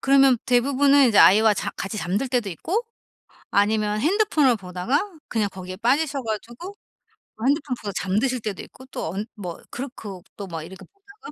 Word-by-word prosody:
그러면 270 -2 +5
대부분은 275 +2 +4
이제 210 - +3
아이와 215 +2 +7
자 - - -3
같이 195 +3 -4
잠들 200 +9 -1
때도 245 -5 0
있고 360 - -2 0.7
아니면 210 +1 +2
핸드폰을 310 - +3
보다가 200 - -2 0.2
그냥 215 -3 0
거기에 185 -1 -8
빠지셔 275 +4 +1
가지고 235 - -6 0.6
그 225 - -4
핸드폰 280 -1 +1
보다 205 -2 -4
잠드실 220 +8 0
때도 210 -3 -5
있고 260 - -14
또 160 - -5
언 200 +3 -3
뭐 180 -5 -7
그렇고 225 -8 -7
또 200 -2 -7
막 165 -3 -6
이렇게 190 +4 -11
보다가 400 +2 -15
235 Hz, 365 characters per minute, -23 LUFS, 200-275 Hz, 0.7 s, 아이와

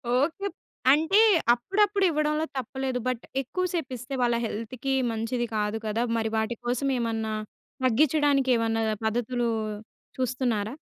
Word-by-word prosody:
Okay. 325 +9 +1 0.4
అంటే 320 +8 +4 0.3
అప్పుడప్పుడు 395 - +1
ఇవ్వడంలో 305 0 +1
తప్పులేదు. 260 0 -2
బట్ 250 -2 -1 0.2
ఎక్కువ 365 +8 -2
సేపు 320 -7 -2
ఇస్తే 250 +3 -8
వాళ్ళ 240 -1 +3
హెల్త్‌కి 235 +5 -3 0.2
మంచిది 230 +2 -2
కాదు 210 +1 0
కదా! 220 +2 0
మరి 220 -1 -1
వాటి 220 +2 0
కోసం 250 +3 0
ఏమన్నా, 225 -2 -1 0.5
తగ్గించడానికి 280 +1 +3
ఏమన్నా 225 0 0 0.2
పద్ధతులు 240 +2 0 0.7
చూస్తున్నారా? 250 -3 -1
250 Hz, 120 wpm, -27 LUFS, 225-290 Hz, 0.7 s, అంటే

